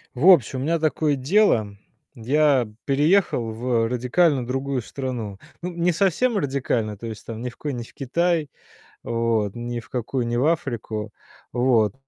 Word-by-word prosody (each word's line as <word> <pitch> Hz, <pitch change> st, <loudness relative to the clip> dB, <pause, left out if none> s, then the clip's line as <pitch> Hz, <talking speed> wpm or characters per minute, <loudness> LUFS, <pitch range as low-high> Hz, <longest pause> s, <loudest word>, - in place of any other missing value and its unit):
В 135 Hz, +8 st, +2 dB
общем, 135 Hz, -, +5 dB
у -, -, -3 dB
меня 165 Hz, +3 st, +1 dB
такое 155 Hz, -1 st, +1 dB
дело 130 Hz, -, +2 dB, 0.4 s
я 135 Hz, +1 st, +2 dB, 0.2 s
переехал 145 Hz, -, +2 dB
в 115 Hz, 0 st, 0 dB
радикально 125 Hz, +3 st, +2 dB
другую 135 Hz, +1 st, -2 dB
страну. 120 Hz, -5 st, -5 dB, 0.2 s
Ну, 180 Hz, +1 st, -4 dB
не 175 Hz, +1 st, +1 dB
совсем 195 Hz, +8 st, +1 dB
радикально, 125 Hz, -, -1 dB
то 115 Hz, -, -9 dB
есть, 110 Hz, -2 st, -7 dB
там, 115 Hz, -1 st, -6 dB
ни 125 Hz, -, -2 dB
в 120 Hz, -, -16 dB
кои 145 Hz, -2 st, -4 dB
не 120 Hz, -2 st, -4 dB
в -, -, -16 dB
Китай, 165 Hz, +3 st, 0 dB, 0.5 s
вот, 115 Hz, -3 st, 0 dB
ни 120 Hz, 0 st, -4 dB
в -, -, -17 dB
какую 125 Hz, 0 st, -2 dB
не 120 Hz, -, -1 dB
в 125 Hz, +4 st, +2 dB
Африку, 115 Hz, -9 st, -2 dB, 0.4 s
вот. 120 Hz, -4 st, +2 dB
130 Hz, 165 wpm, -23 LUFS, 115-155 Hz, 0.5 s, общем